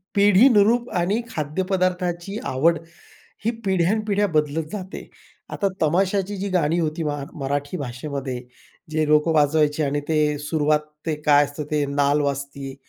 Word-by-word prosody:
पिढीनुरूप 210 +3 +5
आणि 185 +6 +1
खाद्यपदार्थाची 180 +2 -2
आवड, 165 +6 +2 0.7
ही 230 - +3
पिढ्यानपिढ्या 200 +3 +1
बदलत 155 -2 0
जाते. 190 -2 -7 0.4
आता 200 - -1
तमाशाची 190 +5 +1
जी 200 +1 -3
गाणी 170 -2 +1
होती, 160 0 -1
मा 145 -2 -2
मराठी 145 +3 -3
भाषेमध्ये, 130 -1 -5 0.5
जे 155 0 0
लोकं 150 +2 +3
वाजवायचे 150 0 +2
आणि 145 0 0
ते 150 -2 +2
सुरुवात, 150 0 +1 0.3
ते 160 -2 0
काय 145 -1 +5
असतं 145 +1 -6
ते, 150 -1 +1
नाल 145 +1 +1
वाजती 140 -1 -4
155 Hz, 130 wpm, -23 LUFS, 145-190 Hz, 0.7 s, पिढीनुरूप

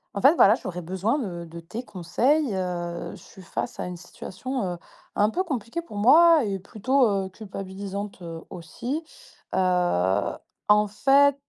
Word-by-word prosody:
En 200 - -2
fait, 285 +5 +7
voilà, 205 - +7
j'aurais 180 -6 -5
besoin 190 - 0
de 180 - -4
de 170 +1 -9
tes 180 +8 -6
conseils, 250 - +1
heu, 175 -2 -3
je - - -14
suis 190 - -14
face 180 - -5
à - - -2
une 180 -1 -6
situation, 215 +7 -5
heu, - - -7 0.4
un 210 +1 +3
peu 370 - 0
compliquée 270 - -3
pour 330 -11 -10
moi 315 +8 +7
et 195 -2 -2
plutôt, 240 +7 +2
heu, 195 -2 -1
culpabilisante, 195 0 -6
heu, 165 -1 -7
aussi, 235 - -5 0.5
heu, 175 - +2 0.3
en 210 0 +5
fait, 275 +6 +4
200 Hz, 160 wpm, -25 LUFS, 180-255 Hz, 0.5 s, fait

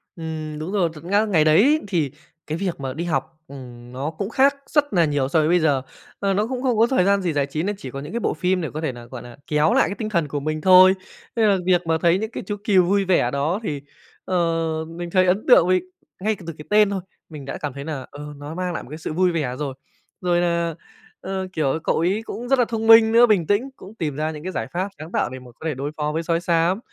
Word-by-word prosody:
Ừm, 155 -2 -5
đúng 160 +4 -5
rồi 190 -5 +1
thật 150 - -12
nga 200 +5 +2
ngày 175 -8 +3
đấy 220 - +5
thì 165 -8 0 0.4
cái 155 - -2
việc 185 -3 -3
mà 135 -1 -4
đi 160 +5 -4
học, 155 -3 -2
ừm, 125 -4 -11
nó 135 +4 -3
cũng 195 +5 -4
khác 275 +4 +3
rất 290 -2 +1
là 170 -3 +4
nhiều 145 -3 0
so 160 - +3
với 155 - +2
bây 175 +2 +4
giờ. 145 -5 +2 0.4
Ờ, 200 -1 +1
nó 210 +3 0
cũng 255 0 -4
không 250 -4 +1
có 225 +2 +5
thời 250 -7 +2
gian 200 0 +3
gì 175 -3 -1
giải 145 -1 +1
trí 155 +3 -3
nên 205 +2 -1
chỉ 130 -9 -8
có 135 - -6
những 150 +7 -8
cái 235 - -1
bộ - - 0
phim 180 +3 0
để 160 - -3
có 155 - -4
thể 155 -4 -1
là, 120 -1 -11
gọi 120 0 -9
là, 120 +1 -12
kéo 150 +1 +2
lại - - +4
cái 200 - -4
tinh 215 -1 -4
thần 170 -7 0
của 145 +1 -3
mình 155 +2 -3
thôi. 185 +1 +8 0.4
Nên 225 -2 +3
là 195 - +3
việc 180 -2 +3
mà 160 0 +2
thấy 170 +1 +4
những 220 +1 -4
cái - - -6
chú 205 - -3
cừu 195 -4 +4
vui 200 +2 +2
vẻ 175 -10 +2
đó 145 +8 -1
thì, 145 -8 -3 0.4
ờ, 185 - -2 0.5
mình 170 +2 -7
thấy 185 +1 +3
ấn 190 +4 +1
tượng, 210 -9 +7
vì 185 0 +3 0.4
ngay 215 +2 +1
cả 185 - -14
từ 165 - -4
cái 150 - -10
tên 210 -1 +5
thôi 195 -2 -2 0.3
mình 150 -4 -9
đã 135 - -5
cảm 145 -3 -5
thấy 140 +1 -7
là, 145 -5 -5
ờ, 150 +1 -8
nó 145 +2 -8
mang 180 0 -2
lại - - -4
một - - -14
cái 155 - -7
sự 160 - -5
vui 180 +2 +2
vẻ 150 -7 -2
rồi. 140 -3 -3 0.5
Rồi 175 -1 +2
là, 170 -2 0 0.5
ờ, 190 0 -4
kiểu, 155 -2 0
cậu - - +1
ấy 185 +6 +1
cũng 245 +2 -6
rất 270 -1 +3
là 245 - +4
thông 225 -1 -3
minh 225 0 +8
nữa, 235 +1 +7
bình 190 -8 +2
tĩnh 210 +7 +1
cũng 200 -1 -13
tìm 155 -9 -3
ra 155 +2 -1
những 150 -1 -9
cái 185 - -4
giải - - -3
pháp 185 +3 -1
sáng 155 +2 -9
tạo - - 0
để 130 +1 -8
mà 125 -1 -14
có - - -10
thể 160 - 0
đối 140 +3 -4
phó 150 0 -1
với 160 +2 -2
sói 165 0 0
xám. 170 +2 +1
170 Hz, 285 wpm, -22 LUFS, 150-195 Hz, 0.5 s, thôi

